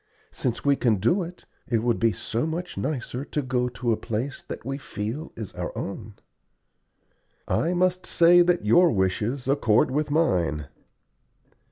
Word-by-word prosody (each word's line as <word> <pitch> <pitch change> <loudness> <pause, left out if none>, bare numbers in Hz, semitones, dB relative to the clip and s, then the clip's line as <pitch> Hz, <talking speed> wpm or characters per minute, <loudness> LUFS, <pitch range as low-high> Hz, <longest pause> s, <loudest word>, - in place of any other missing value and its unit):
Since 120 +1 -3
we 140 0 +5
can 120 -5 +2
do 120 - +2
it, 175 +1 -8 0.2
it 115 -2 0
will 120 0 +3
be 115 0 +2
so 115 - -2
much 175 +3 -4
nicer 130 -2 -3
to 150 - -2
go 125 -1 0
to 125 -1 -2
a - - +3
place 120 +5 -4
that - - -7
we 135 +2 -3
feel 115 +6 -5
is 110 -3 -7
our - - -4
own!" 100 +1 -6 1.3
"I 170 +3 +1
must 185 0 +1
say 175 +1 +6
that 175 -7 +2
your 170 +12 +6
wishes 105 +7 -1
accord 130 -6 +3
with 150 +2 0
mine." 85 - +1
125 Hz, 160 wpm, -25 LUFS, 110-160 Hz, 1.3 s, say